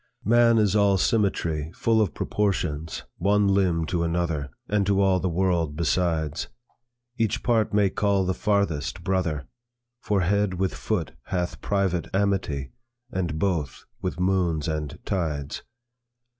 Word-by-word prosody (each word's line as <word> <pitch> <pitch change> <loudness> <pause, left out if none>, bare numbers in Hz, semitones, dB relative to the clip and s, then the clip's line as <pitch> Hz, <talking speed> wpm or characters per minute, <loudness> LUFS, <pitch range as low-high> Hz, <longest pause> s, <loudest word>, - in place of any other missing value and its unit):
"Man 115 +1 +5
is 105 -2 +3
all 100 -2 +4
symmetry, 85 -8 0
Full 115 -1 +2
of 100 -8 0
proportions, 80 -7 -1
one 100 +2 +3
limb 95 -4 +2
to 85 +1 -1
another, 85 -4 -1 0.2
And 105 -1 +1
to 100 -1 +3
all 95 -2 +3
the 90 - -1
world 85 -4 0
besides. 80 -2 0 0.7
Each 115 +1 0
part 115 -3 +2
may 100 -2 +3
call 100 -2 +1
the 95 - +1
farthest, 100 -9 0
brother; 85 -7 -1 0.5
For 100 -4 0
head 100 +1 +1
with 95 +1 -1
foot - - -2
hath 90 -1 -3
private 95 -4 0
amity, 95 -9 0 0.4
And 85 -7 -2
both 80 -7 -1 0.2
with 90 -2 -3
moons 90 -5 +1
and 75 -2 -3
tides. 75 -6 -2
95 Hz, 135 wpm, -25 LUFS, 80-100 Hz, 0.7 s, Man